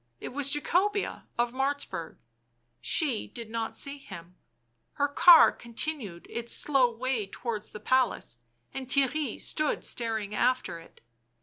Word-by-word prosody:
It - - -6
was 280 +1 +1
Jacobea 390 +7 0
of 240 0 0
Martzburg. 270 - -2 0.6
She 275 -9 +2
did 230 -2 -9
not 225 -1 -3
see 280 0 -2
him; 180 -7 -11 0.6
her 285 0 +1
car 325 +3 +8
continued 235 - -6
its 235 0 -3
slow 270 -4 +4
way 235 -2 -2
towards 215 0 -5
the 210 - -9
palace, 250 - 0 0.4
and 265 -1 -6
Theirry 270 0 0
stood 305 -1 0
staring 220 -3 -3
after 250 -6 0
it. 165 - -18
250 Hz, 130 wpm, -28 LUFS, 220-285 Hz, 0.6 s, car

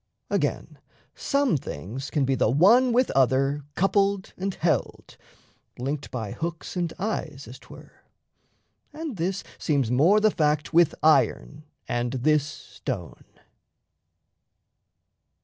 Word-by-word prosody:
Again, - - -2 0.3
some 280 - +1
things 120 - -7
Can 145 -3 0
be 135 - +1
the 125 - +2
one 215 - +5
with 250 +2 +2
other 135 +2 +2
coupled 195 +1 +1
and 195 +1 -3
held, 160 -1 -2 0.6
Linked 140 +3 -4
by 110 -5 -5
hooks 165 +2 -5
and 175 -2 -1
eyes, 165 -9 -4
as 125 +3 -11
'twere; - - -16 0.9
and 305 -6 -6
this 185 +3 -2 0.2
Seems 140 -6 0
more 165 +12 +4
the 215 0 +3
fact 150 -2 0
with 165 -1 +4
iron 150 0 +2 0.2
and 120 +1 -2
this 150 +3 +2
stone. 145 - -7
155 Hz, 115 wpm, -25 LUFS, 135-195 Hz, 0.9 s, one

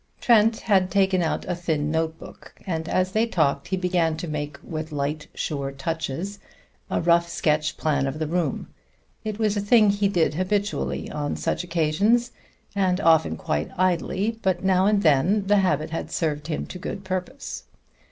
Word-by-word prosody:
Trent 225 -1 +4
had 190 -3 +2
taken 190 0 +2
out 165 - -1
a 180 - 0
thin 160 -4 -1
notebook, 160 0 -4
and 165 -3 -3
as 185 0 +1
they 220 +3 +2
talked 145 -9 +1
he 190 - -1
began 175 -3 +1
to 170 - -5
make, 150 -1 -4
with 155 -1 -5
light, 150 +1 -3
sure 140 -2 -3
touches, 165 +7 -4 0.5
a - - 0
rough 170 0 +3
sketch 155 -1 0
plan 140 -3 +1
of 135 - -3
the 155 - -1
room. 165 -2 -1 0.6
It 215 -1 -4
was 215 -2 +1
a 205 - 0
thing 210 0 +5
he 200 0 +1
did 175 -6 +1
habitually 200 +4 -1
on 145 -1 -2
such - - -2
occasions, 180 +9 +1 0.4
and 185 -2 +2
often 160 - +3
quite 75 0 -2
idly, 185 +5 0
but 185 -2 0
now 190 0 +3
and 205 -1 +2
then 170 +7 +3
the 205 +1 +4
habit 155 -6 +1
had 165 - -4
served 150 -2 -2
him 155 - -2
to 180 - -8
good 195 +2 -5
purpose. 190 +9 -5
175 Hz, 170 wpm, -24 LUFS, 155-195 Hz, 0.6 s, thing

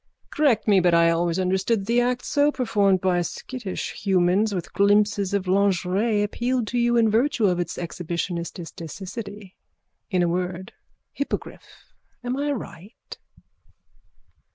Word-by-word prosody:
Correct 275 -9 +2
me 200 -2 +5
but 175 -1 +3
I 170 0 +5
always 170 +1 0
understood 190 +4 +1
that - - -8
the 235 +3 +2
act 245 0 -1
so 290 +1 +2
performed 205 -8 +1
by 180 -2 +2
skittish 205 +3 -5
humans 190 +2 +1
with 180 -4 -5
glimpses 205 -1 +2
of 200 -2 -1
lingerie 200 +3 +1
appealed 240 +3 -1
to 245 - -1
you 240 0 +2
in 230 -1 +4
virtue 230 +1 +2
of 180 -2 +2
its 175 -1 -3
exhibitionististicicity. 175 +4 -6 0.6
In 185 -4 +1
a - - +2
word. 180 +1 -3 0.4
Hippogriff. 280 - -6 0.3
Am 245 +1 -2
I 290 +1 -1
right? 205 -5 -8
200 Hz, 135 wpm, -24 LUFS, 180-230 Hz, 0.6 s, me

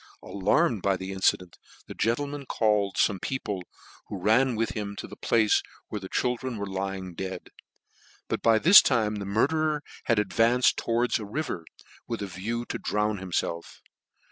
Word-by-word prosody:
Alarmed 105 - +1
by 95 0 +1
the 95 +1 -6
incident, 95 -2 0 0.3
the - - -8
gentleman 140 +5 -2
called 105 -3 +1
fome 95 -3 +1
people, 105 -8 -3 0.5
who 100 - -5
ran 115 +6 +3
with 115 +1 0
him 100 -2 -5
to - - -6
the - - -10
place 110 -2 +2 0.3
where 105 - -4
the 95 - -8
children 125 -1 -1
were 100 - -3
lying 95 -1 -4
dead: 95 +2 -6 0.8
but - - -2
by 115 -1 +4
this 180 - +9
time 110 -5 +1
the 100 - -5
murderer 150 +9 +1 0.2
had 115 - +2
advanced 115 +4 +3
towards 120 +1 0
a - - -6
river, 100 - -4 0.4
with 115 -3 -3
a - - -2
view 110 +6 -4
to - - -5
drown 105 -1 -1
himfelf. 85 -2 -4
105 Hz, 165 wpm, -27 LUFS, 95-120 Hz, 0.8 s, this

